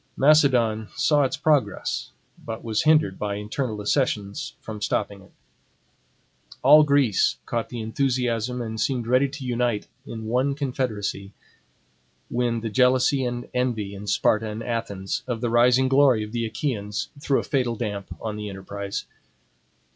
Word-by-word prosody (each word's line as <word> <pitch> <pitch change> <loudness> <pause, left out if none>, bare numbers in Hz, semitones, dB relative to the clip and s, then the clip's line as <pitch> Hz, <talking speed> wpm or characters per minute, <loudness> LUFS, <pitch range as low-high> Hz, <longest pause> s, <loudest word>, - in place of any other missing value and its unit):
Macedon 130 -7 +4
saw 150 -2 +3
its 130 - -2
progress; 140 -9 0 0.3
but 110 -1 -6
was 110 -2 0
hindered 155 -11 +3
by 105 -1 -2
internal 110 +3 -3
dissensions 105 +3 -1
from 110 -2 -8
stopping 100 -1 -2
it. 95 - -19 1.3
All 150 +4 +8
Greece 140 - +3
caught 115 -1 -2
the 120 -2 -5
enthusiasm 125 0 -1
and 110 -1 -4
seemed 125 -4 0
ready 130 +4 +3
to 140 0 -8
unite 120 -3 -1 0.2
in 110 -1 -6
one 130 +5 +1
confederacy, 110 -8 -3 1.0
when 120 -1 0
the 115 - -3
jealousy 130 +3 +3
and 120 0 -4
envy 115 -6 -1
in 100 +1 -8
Sparta 110 +3 +2
and 110 +2 -5
Athens, 100 -5 -3
of 120 -3 -2
the 120 -1 -1
rising 125 +2 +4
glory 135 -4 +4
of 105 - -8
the 115 -1 -1
Achaeans, 110 -3 -3
threw 140 -1 +1
a - - -3
fatal 125 -4 0
damp 105 -4 -4
on 110 -1 -4
the 105 -1 -5
enterprise. 100 +1 -5
115 Hz, 145 wpm, -24 LUFS, 105-130 Hz, 1.3 s, All